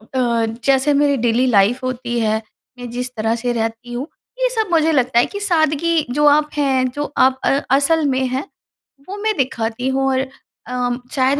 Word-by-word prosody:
अ, 235 -3 +1 0.2
जैसे 275 +1 +3
मेरी 285 -1 +2
daily 240 +2 +1
life 220 +1 +3
होती 240 -1 -3
है, 220 -1 0 0.4
मैं 245 -1 -7
जिस 250 +1 -4
तरह 225 +1 0
से 240 +1 -2
रहती 230 +1 -4
हूँ, 255 +4 -4 0.3
ये - - +2
सब 440 -4 -1
मुझे 325 -1 +3
लगता 255 -4 +2
है - - +4
कि 405 - -7
सादगी 330 -3 +1
जो 295 +3 +1
आप 300 +1 +4
हैं, 265 -3 +1
जो 290 +3 -5
आप 260 0 +3
अ - - +3 0.3
असल 300 +2 +2
में 260 0 0
हैं 260 +2 -3 0.6
वो 405 - -5
मैं 435 +1 -1
दिखाती 245 -1 -2
हूँ 270 0 0
और 260 - +1 0.5
अ, 245 -1 -1 0.2
शायद 270 +2 +2
260 Hz, 190 wpm, -19 LUFS, 240-295 Hz, 0.6 s, है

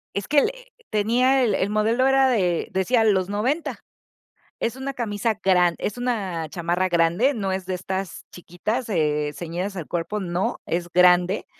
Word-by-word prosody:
es 200 - -3
que 290 -1 +4
le - - 0 0.4
tenía 245 +5 +2
el 220 -4 +2
el 195 - 0
modelo 225 +5 +2
era 270 0 +4
de 180 -8 +1
decía 225 +5 +2
los 190 -3 +2
noventa. 250 +11 -1 0.8
Es 235 +2 -1
una 270 +1 -5
camisa 220 -2 -1
grande 180 -2 +3
es 210 - -2
una 195 -10 -2
chamarra 175 +2 -1
grande, 175 +10 +2
no 195 -4 -2
es 190 -1 -3
de 185 - -2
estas 190 +1 -5
chiquitas, 210 +8 -4
eh, 150 -4 0
ceñidas 180 +4 -4
al 170 -5 -5
cuerpo. 175 +5 -3
No. 175 0 -2
Es 175 +1 -2
grande, 180 +1 +4
195 Hz, 165 wpm, -23 LUFS, 175-230 Hz, 0.8 s, que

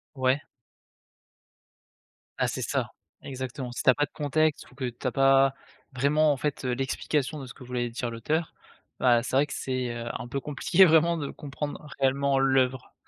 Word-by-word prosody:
Ouais. 130 +2 +2 2.0
Ah, - - +2
c'est - - -3
ça, - - -1 0.3
exactement. 130 -1 -5
Si 120 - -4
tu - - +4
as - - +6
pas 145 - +1
de - - -23
contexte, 155 +1 0
ou - - -19
que 135 -1 -4
tu 120 +2 -6
as - - 0
pas 135 0 +4 0.4
vraiment, 150 +4 +3
en 140 - 0
fait, 145 -1 -3
heu, 125 - 0
l'explication 135 +3 -1
de 135 - -7
ce 125 - -10
que - - -12
voulait 125 -1 -2
dire 120 0 -4
l'auteur, 150 +9 -2 0.5
bah, 120 -2 +4
c'est 130 - -3
vrai 140 +2 +4
que 145 - -7
c'est, 130 -2 -2
heu, 115 - -5
un - - -5
peu 140 +3 -3
compliqué 160 +7 +4
vraiment 165 0 +4
de 145 -3 -4
comprendre 150 +3 -6
réellement 140 +1 +2
l'œuvre. 130 -1 +1
135 Hz, 190 wpm, -27 LUFS, 125-145 Hz, 2.0 s, as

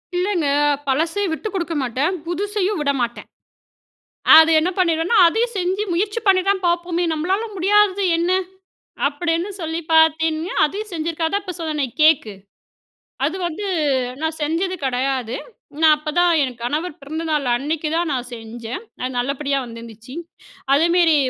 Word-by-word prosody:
இல்லங்க. 360 -4 0 0.4
பழசை 325 +9 0
விட்டு 430 - -4
கொடுக்க 340 -3 -2
மாட்டேன், 265 +8 -1
புதுசையும் 400 +2 -1
விடமாட்டேன். 265 -5 -2 1.1
அது 320 0 +7
என்ன 340 - 0
பண்ணிடுவேன்னா, 335 +4 +2
"அதையும் 460 +6 0
செஞ்சு 375 +3 0
முயற்சி 410 +5 -1
பண்ணி 380 -1 +5
தான் 385 -2 +1
பார்ப்போமே. 345 0 0
நம்மளால 375 +8 -1
முடியாதது 400 +1 +3
என்ன?" 340 +2 0 0.8
அப்டீன்னு 330 +5 -2
சொல்லி 325 +1 -3
பாத்தீங்கன்னா 320 +1 +2
அதையும் 415 +7 -5
செஞ்சிருக்கா. 325 0 -2
அதான் 405 +3 -1
இப்போ 365 -3 -6
சொன்னன்ன, 305 -4 -1 0.2
"கேக்கு". 305 -9 +4 0.9
அது 325 +6 0
வந்து 345 +5 -4 0.6
நான் 320 0 -2
செஞ்சது 335 +5 -1
கடையாது. 255 -1 -1 0.5
நான் 315 -1 +7
அப்பதான், 320 +4 +1
என் 255 -4 -2
கணவர் 300 +8 -2
பிறந்த 315 +4 -5
நாள் 300 -3 0
அன்னைக்கு 300 +5 -2
தான் 335 -1 0
நான் 250 -2 -2
செஞ்சேன். 230 - -7 0.2
அது 255 - -1
நல்லபடியா 275 +3 -1
வந்துருந்துச்சு. 230 0 -11 0.6
அதேமேரி, 335 +2 +4
325 Hz, 130 wpm, -20 LUFS, 280-360 Hz, 1.1 s, அது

